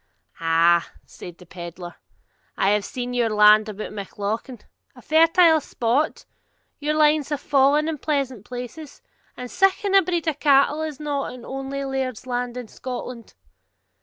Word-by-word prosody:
'Ah,' 165 +1 +2
said 175 -1 -11
the 180 - -15
pedlar, 175 0 -9 0.6
'I 195 - +2
have 210 0 +1
seen 245 -1 -5
your 240 -2 +1
land 210 0 +5
about 215 0 -7
Mauchlin. 210 +4 -5 0.4
A - - -14
fertile 325 0 +5
spot! 245 +4 -1 0.5
your 300 +1 -1
lines 300 -1 +3
have 295 -2 -2
fallen 290 +2 +3
in 320 -3 -3
pleasant 270 -8 -2
places! 250 +6 -9 0.3
And 250 -1 -7
siccan 390 +1 +1
a 390 - +7
breed 345 -2 -2
o' 320 - +2
cattle 285 +1 +3
is 310 -2 -5
not 290 -2 -3
in 250 -2 -11
ony 270 +1 -5
laird's 265 -3 -3
land 245 -1 -3
in 245 -2 -6
Scotland.' 250 -1 -8
260 Hz, 150 wpm, -23 LUFS, 215-300 Hz, 0.6 s, a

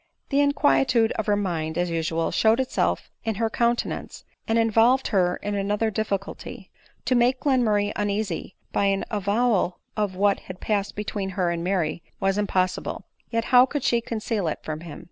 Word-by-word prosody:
The 275 - +2
inquietude 225 - +3
of 220 - -3
her 205 - +3
mind, 165 -5 -2
as 175 -1 0
usual, 165 0 -1
showed 220 +2 +3
itself 260 -1 -1
in 225 -2 -1
her 225 +1 -1
countenance, 235 +1 -1 0.2
and 225 - +2
involved 230 +3 +3
her 180 -4 +2
in 205 - -2
another 205 +2 0
dif 220 +1 -2
ficulty; 195 0 -5 0.4
to - - +2
make 250 +1 +3
Glenmurray 215 -7 +2
uneasy 205 -3 -2 0.2
by 200 - +1
an 195 0 +1
avowal 205 -2 +1 0.2
of 205 -3 -1
what 200 +1 +2
had 185 0 -10
passed 205 -2 -1
between 205 -2 -3
he* 195 - -1
and 170 -1 0
Mary 175 -3 -1 0.2
was 195 +1 +1
impossible; 185 -3 -1 0.3
yet 230 -1 -1
how 250 +1 +8
could 285 0 -3
she 235 -1 +2
conceal 220 -4 -2
it 155 - -1
from 155 -1 -4
him 160 -3 -9
205 Hz, 175 wpm, -25 LUFS, 185-230 Hz, 0.4 s, how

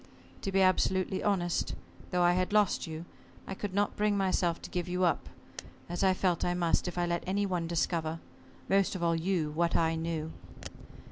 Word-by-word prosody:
To 195 - -3
be 195 0 +4
absolutely 185 0 +2
honest 180 -4 0 0.3
though 180 -1 +2
I 175 0 +5
had 185 +1 0
lost 210 -5 +2
you, 160 +1 -6 0.4
I - - -5
could 200 +1 -4
not 205 0 +1
bring 210 -1 +1
myself 185 -3 +1
to - - -7
give 180 -1 -2
you 180 +1 0
up, 170 -4 +1 0.6
as 175 +2 -2
I 190 -1 +4
felt 180 -3 +1
I 175 - +1
must, 175 0 +1
if 180 - -5
I 175 - +2
let 170 0 -1
any 200 +2 +1
one 180 -3 -1
discover 165 -1 -1 0.5
most 195 0 +2
of 180 - -3
all 165 -1 +3
you 165 -2 0
what 170 +2 0
I 165 -1 +3
knew. 160 -1 -3
175 Hz, 195 wpm, -31 LUFS, 170-190 Hz, 0.6 s, I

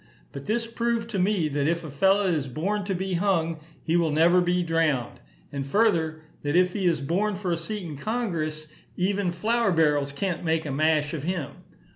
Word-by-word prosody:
But 140 0 -8
this 230 +2 0
proved 230 0 -2
to 200 - -1
me, 185 -3 +2
that 145 0 0
if 170 +1 0
a 155 - -7
fellow 195 +8 +3
is 160 -7 0
born 195 +11 -2
to 195 -1 -1
be 190 +1 -2
hung, 170 -3 +1 0.2
he 165 - 0
will 170 -2 +3
never 165 +4 +4
be 180 0 +1
drowned; 160 -7 0 0.3
and, 140 -1 -3
further, 160 -2 +1 0.2
that 145 +2 -1
if 180 0 +4
he 195 -3 0
is 165 -4 +1
born 195 +8 0
for 185 -2 -3
a 170 - +1
seat 205 +4 -4
in 155 -4 -6
Congress, 160 - -2 0.3
even 195 0 +1
flour 225 +5 +1
barrels 150 -4 +2
can't 175 +4 -3
make 160 -1 0
a 145 - -3
mash 150 +1 +1
of 155 - -3
him. 165 -2 -3
170 Hz, 200 wpm, -26 LUFS, 155-195 Hz, 0.3 s, never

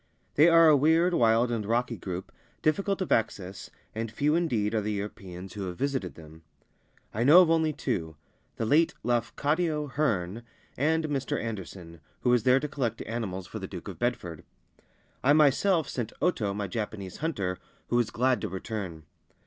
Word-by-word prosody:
They 155 +4 +6
are 165 -1 +7
a 155 - +7
weird, 160 +5 +3
wild, 115 -3 +3
and 115 -2 -1
rocky 115 +3 0
group, 95 -1 -6 0.3
difficult 195 +5 +1
of - - -8
access, 95 -4 -1 0.2
and 115 +1 -3
few 145 +6 +1
indeed 120 -11 +1
are 110 - +1
the 105 +1 -2
Europeans 95 -2 -6
who 100 -2 -4
have 90 -1 -6
visited 130 - -2
them. 80 0 -13 0.7
I 110 - 0
know 155 +8 +9
of 165 - +1
only 160 -1 +3
two 80 - -3 0.2
— - - -41
the 110 - -1
late 155 +8 +3
Lafcadio 150 +7 0
Hearn 110 -8 -1 0.3
and 160 +4 +1
Mr. 140 -3 -2
Anderson 90 -6 -7 0.2
(who 125 - +2
was 125 -1 +4
there 125 +3 +4
to 150 - -3
collect 120 -6 -3
animals 100 -5 -4
for - - -7
the - - -6
Duke - - -8
of - - -9
Bedford). 105 -10 -2 0.8
I 140 +3 +5
myself 155 +3 +3
sent 115 -3 -4
Oto, 120 - +1
my 100 +1 -3
Japanese 100 -2 -5
hunter, 100 - -2 0.3
who - - 0
was 120 -2 +2
glad 125 -1 +1
to 105 - -3
return. 95 -4 -5
115 Hz, 175 wpm, -28 LUFS, 100-150 Hz, 0.8 s, know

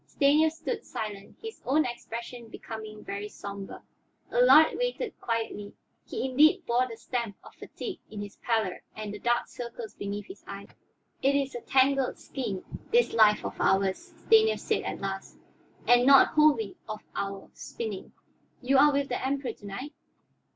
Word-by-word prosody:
Stanief 305 +3 +3
stood 435 +7 -4
silent, 205 -2 -6
his 445 0 -8
own 300 +5 +2
expression 235 0 -6
becoming 220 -1 -8
very 200 +1 -5
somber. 200 -1 -8 0.5
Allard - - +6
waited - - -2
quietly; 225 -3 -3 0.3
he - - -2
indeed 290 +5 +4
bore 245 +2 +2
the 230 - -8
stamp 235 -4 -3
of - - -14
fatigue 405 -5 -7
in 215 - -8
his 205 0 -7
pallor 220 -6 -1
and 215 -1 -5
the 210 - -7
dark 240 0 +1
circles 235 -2 -7
beneath 200 +1 -5
his 380 - -12
eyes. - - -8 0.5
"It 275 +1 +3
is 275 -1 0
a 240 - -5
tangled 270 0 +2
skein, 210 -9 -5 0.3
this 480 +1 +3
life 215 -2 +5
of - - -5
ours," 195 - +1
Stanief 440 0 +5
said - - 0
at - - -5
last, 195 0 -5 0.5
"and 245 0 +6
not 275 -1 +8
wholly 310 +6 +3
of 215 0 -6
our 195 -1 -4
spinning. 215 -4 -6 0.5
You 265 +1 +3
are 295 +1 +7
with 280 -1 0
the 245 - -3
Emperor 270 -2 -1
to 205 - -16
night?" 255 +10 -6
240 Hz, 160 wpm, -28 LUFS, 210-280 Hz, 0.5 s, not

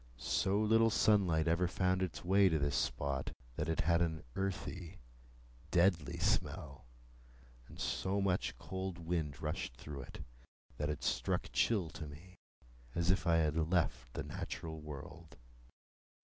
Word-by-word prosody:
So 95 +9 +1
little 110 +1 +5
sunlight 95 -8 +3
ever 85 +2 +3
found 95 0 +1
its 90 -2 -3
way 95 +1 +6
to 80 - +2
this 70 -1 0
spot, 70 -1 -1 0.2
that - - -2
it 80 - +1
had 85 +1 +3
an 80 -3 0
earthy, 95 -2 -3 0.7
deadly 85 -5 +3
smell; 70 -4 -1 0.8
and - - -13
so 95 +2 0
much 95 -10 0
cold 95 +6 -4
wind 80 -4 -2
rushed 75 -5 -3
through 70 -2 -7
it, - - -9 0.5
that 75 +1 -1
it 75 - -3
struck - - 0
chill 100 -8 +2
to 80 - -6
me, 90 +6 -13 0.6
as 85 +1 +3
if 95 - 0
I 85 - +5
had 80 -2 +2 0.2
left 85 -8 +1
the - - -2
natural 80 -1 -5
world. 75 +1 -9
85 Hz, 145 wpm, -35 LUFS, 75-95 Hz, 0.8 s, way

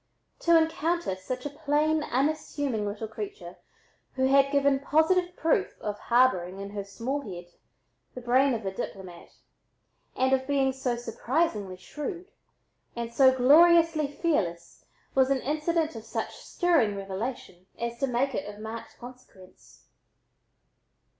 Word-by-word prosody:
To 335 -1 +5
encounter 325 - 0
such 250 +8 -6
a - - -2
plain 300 +2 +1
unassuming 280 -5 -1
little 210 +2 -4
creature 405 - -8 0.6
who 260 0 +1
had 275 +1 +4
given 280 -1 +3
positive 350 +5 +2
proof 330 +4 0
of 210 -1 -4
harboring 195 -7 +2
in 200 0 -6
her 205 -1 -4
small 235 +8 -4
head 175 -7 -9 0.6
the 250 - -6
brain 255 +2 +3
of 220 -2 -6
a 190 - -2
diplomat 185 -3 -7 0.9
and 260 +1 +2
of 260 0 +1
being 270 -2 +2
so 255 -2 -2
surprisingly 235 - -2
shrewd, 345 - -7 0.6
and 235 0 -5
so 260 0 +6
gloriously 325 +3 +5
fearless, 175 - -2 0.3
was 265 0 +3
an 270 -2 +1
incident 310 +1 -1
of 225 - -7
such 225 - -4
stirring 315 - +1
revelation 195 -2 -6
as 235 0 -4
to 275 - +1
make 255 +2 0
it 205 - -4
of 205 - -14
marked 220 +1 -8
consequence. 240 -7 -15
260 Hz, 135 wpm, -27 LUFS, 215-300 Hz, 0.9 s, so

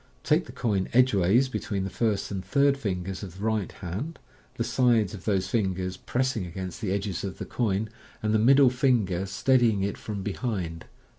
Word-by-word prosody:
Take 160 +3 +2
the - - -8
coin 100 -6 -1
edgeways 120 -1 +4
between 100 -6 -3
the. 95 - -4
first 110 -4 -1
and 95 -2 -3
third 140 +8 +3
fingers 95 -7 -3
of 95 -3 -8
the 100 - -7
right 110 -3 0
hand, 100 - -5 0.4
the 115 - -1
sides 120 -4 +2
of 95 -4 -9
those 95 -3 +1
fingers 95 -4 -1
pressing 130 -4 -1
against 90 +1 -6
the 100 -5 -1
edges 100 -2 -2
of 95 -1 -5
the - - -5
coin, 110 -3 -1 0.4
and 105 0 +1
the 110 - +4
middle 135 +3 +6
finger 110 -8 +1
steady 120 +5 +3
ing 100 -3 0
it 100 - -2
from 100 -3 -5
behind. 95 -6 -3
105 Hz, 190 wpm, -27 LUFS, 95-120 Hz, 0.4 s, middle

